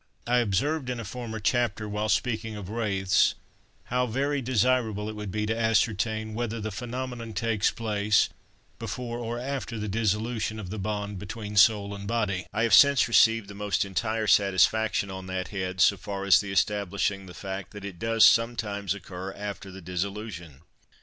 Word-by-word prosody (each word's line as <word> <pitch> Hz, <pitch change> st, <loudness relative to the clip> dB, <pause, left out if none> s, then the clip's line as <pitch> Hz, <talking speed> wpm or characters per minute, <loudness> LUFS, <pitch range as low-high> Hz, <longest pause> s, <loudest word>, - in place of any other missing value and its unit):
I 125 Hz, +1 st, +3 dB
observed 125 Hz, -, 0 dB
in 125 Hz, -1 st, -3 dB
a 115 Hz, -, -5 dB
former 115 Hz, 0 st, -6 dB
chapter, 110 Hz, -1 st, 0 dB
while 105 Hz, +1 st, -2 dB
speaking 110 Hz, +1 st, 0 dB
of 100 Hz, -1 st, -7 dB
wraiths, 100 Hz, -3 st, +2 dB, 0.6 s
now 125 Hz, 0 st, +1 dB
very 140 Hz, +4 st, -1 dB
desirable 120 Hz, -4 st, +1 dB
it 110 Hz, -, -5 dB
would 105 Hz, -1 st, -5 dB
be 105 Hz, +2 st, -2 dB
to 110 Hz, +1 st, -1 dB
ascertain 110 Hz, -1 st, +1 dB
whether 115 Hz, 0 st, -3 dB
the 110 Hz, 0 st, -4 dB
phenomenon 120 Hz, +1 st, -5 dB
takes 110 Hz, -1 st, +1 dB
place 105 Hz, -2 st, +1 dB, 0.5 s
before 120 Hz, +1 st, -4 dB
or 120 Hz, 0 st, -3 dB
after 130 Hz, -2 st, -4 dB
the 105 Hz, 0 st, -3 dB
dissolution 110 Hz, +1 st, -1 dB
of 95 Hz, -4 st, -7 dB
the 110 Hz, -, -4 dB
bond 105 Hz, 0 st, -3 dB
between 105 Hz, +1 st, -6 dB
soul 100 Hz, 0 st, +4 dB
and 100 Hz, 0 st, -7 dB
body: 105 Hz, -5 st, -1 dB
I 110 Hz, +2 st, 0 dB
have 115 Hz, -, +2 dB
since 140 Hz, -2 st, +7 dB
received 115 Hz, -2 st, +4 dB
the 100 Hz, -, -9 dB
most 100 Hz, 0 st, -1 dB
entire 110 Hz, +3 st, -1 dB
satisfaction 100 Hz, +1 st, +3 dB
on 95 Hz, 0 st, -7 dB
that 95 Hz, -2 st, -3 dB
head, 95 Hz, -2 st, -4 dB
so 100 Hz, -, +5 dB
far 100 Hz, +1 st, -5 dB
as 100 Hz, -, +7 dB
the 100 Hz, -1 st, -6 dB
establishing 100 Hz, 0 st, 0 dB
the 90 Hz, -, -11 dB
fact 95 Hz, 0 st, -6 dB
that 100 Hz, -1 st, -9 dB
it 95 Hz, -4 st, -8 dB
does 115 Hz, -1 st, +4 dB
sometimes 105 Hz, -4 st, +2 dB
occur 95 Hz, -1 st, -7 dB
after 100 Hz, -1 st, -6 dB
the 95 Hz, 0 st, -10 dB
dissolution. 90 Hz, -4 st, -5 dB
105 Hz, 175 wpm, -27 LUFS, 100-115 Hz, 0.6 s, since